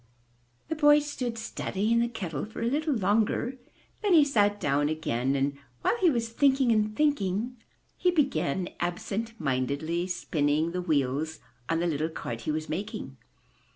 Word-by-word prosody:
The 320 - -2
boy 295 -1 +6
stood 255 -5 -3
studying 225 0 -1
the 235 - +2
kettle 185 - -4
for 220 +1 -6
a - - +1
little 295 +3 +1
longer, 220 +5 +1 0.4
then 410 -3 +2
he 310 - +8
sat 205 -7 +2
down 145 +1 +1
again 135 -4 -1
and 140 +1 0 0.3
while - - +3
he 370 -6 +4
was 235 -5 0
thinking 265 0 +3
and 215 -1 +1
thinking, 245 -5 +1 0.4
he 365 - +2
began 265 - +1
absent 205 +6 -3
mindedly 145 +5 -1
spinning 155 -2 0
the 180 +1 -2
wheels 155 -1 0 0.3
on 165 0 +1
the - - +1
little 160 -1 0
cart 115 -7 -5
he 155 - -2
was 155 +1 -3
making. 185 - -5
200 Hz, 155 wpm, -28 LUFS, 155-245 Hz, 0.4 s, he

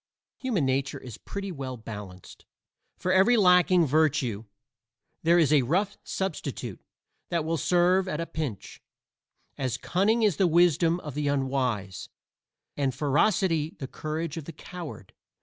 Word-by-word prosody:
Human 230 - 0
nature 130 0 0
is 125 -5 -10
pretty 200 -1 -6
well 135 -5 -5
balanced; 105 -5 -10 0.5
for 185 - -1
every 195 +6 +5
lacking 180 -3 +5
virtue 140 -7 +1 0.8
there 170 +2 +4
is 155 -3 +4
a 145 - +6
rough 185 - 0
substitute 140 - -4 0.5
that 170 -3 -1
will 165 +1 0
serve 180 +4 +3
at 150 -4 -3
a 165 - -1
pinch 145 - -6 0.8
as 130 -3 -1
cunning 210 - +1
is 205 -7 +3
the 190 - +4
wisdom 170 0 +3
of 150 - -7
the 145 +1 -2
unwise, 130 -9 -1 0.7
and 135 -3 -1
ferocity 160 +1 +1
the 135 - -6
courage 155 +2 -4
of 160 - -6
the 165 - -8
coward. 165 - -9
155 Hz, 140 wpm, -27 LUFS, 130-180 Hz, 0.8 s, a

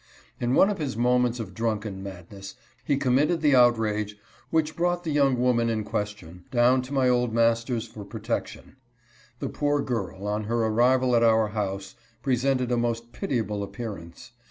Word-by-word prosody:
In 120 +2 +1
one 200 - +5
of 200 - -4
his 135 -8 -3
moments 125 0 +2
of 100 -5 -6
drunken 105 -3 -3
madness 95 +1 -9 0.3
he 140 - +1
committed 145 +5 +2
the 150 -2 +4
outrage 110 -4 +2 0.3
which 160 -1 0
brought 175 0 0
the 160 - -2
young 140 -4 +2
woman 120 -2 +2
in 110 -1 -1
question 100 -5 -5
down 125 0 +3
to 130 +2 -10
my 135 -2 +2
old 125 -2 +1
master's 115 0 +1
for 110 -2 -10
protection. 110 +5 -5 0.6
The - - -4
poor 145 0 0
girl, 100 -5 -4
on 105 +1 -2
her 115 +1 0
arrival 125 +3 +3
at 115 - +4
our 110 -2 +4
house, 100 -2 -4 0.3
presented 130 -1 +1
a 120 - +2
most 120 0 -2
pitiable 115 - -2
appearance. 100 0 -7
115 Hz, 165 wpm, -26 LUFS, 105-130 Hz, 0.6 s, one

